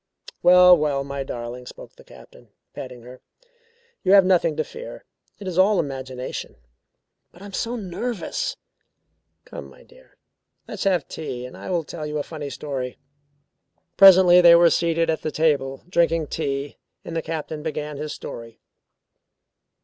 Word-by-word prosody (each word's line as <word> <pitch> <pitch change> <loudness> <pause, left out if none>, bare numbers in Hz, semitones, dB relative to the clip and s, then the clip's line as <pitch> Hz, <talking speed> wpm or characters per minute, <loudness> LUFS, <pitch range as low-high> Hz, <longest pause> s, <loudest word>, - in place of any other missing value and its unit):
"Well, 180 0 +7
well, 145 -4 -1
my 140 0 -5
darling," 125 -1 -7
spoke - - -12
the - - -17
Captain, - - -17 0.2
petting 125 -2 -9
her. 125 +1 -13 0.8
"You 190 0 +3
have 195 -2 +7
nothing 175 -4 +2
to 155 - +1
fear. 475 +2 -10 0.3
It 200 - -9
is 180 -1 -2
all 200 +1 +4
imagination." 130 -3 -5 0.8
"But 175 - -16
I - - -9
am 200 - -11
so 235 +5 -2
nervous." 240 - -4 0.9
"Come, - - -10
my - - -18
dear. - - -22 0.5
Let's - - -6
have 180 -6 +1
tea 125 -6 -6
and 125 - -10
I - - -9
will 175 -3 0
tell 155 0 -7
you 150 0 -4
a 145 - -2
funny 150 -3 -7
story." 130 -2 -5 1.0
Presently 185 -2 +8
they 170 -1 +8
were 170 -1 +5
seated 165 0 +1
at 160 - -3
the - - -3
table 145 -4 0
drinking 165 -3 +1
tea, 140 -2 -4 0.3
and 165 - -7
the 165 - -1
Captain 155 -1 -5
began 150 -1 -5
his 150 +1 -5
story. 115 -1 -9
160 Hz, 155 wpm, -23 LUFS, 140-180 Hz, 1.0 s, Presently